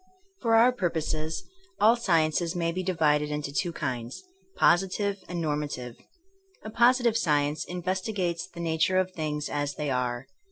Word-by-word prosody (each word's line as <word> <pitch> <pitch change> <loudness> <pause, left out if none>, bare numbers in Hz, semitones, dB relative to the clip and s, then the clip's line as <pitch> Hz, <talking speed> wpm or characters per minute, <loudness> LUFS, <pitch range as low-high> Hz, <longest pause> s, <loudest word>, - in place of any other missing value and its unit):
For 230 -2 +3
our 235 +3 +6
purposes, 160 -7 -2 0.4
all 225 +3 +6
sciences 170 -5 +1
may 170 -1 0
be 185 +2 -3
di 185 0 -1
vided 150 -2 +2
into 150 -1 -4
two 175 +3 0
kinds: 125 - -4 0.3
positive 195 +3 +2
and 175 -1 -3
normative. 145 -6 -3 0.7
A 215 - -7
positive 240 0 +4
science 150 -4 +1
investigates 180 0 -2
the 170 -2 -9
nature 165 +2 +1
of 185 0 +1
things 150 -3 -3
as 145 -1 -2
they 150 -1 -2
are. 125 0 -1
165 Hz, 150 wpm, -27 LUFS, 150-185 Hz, 0.7 s, our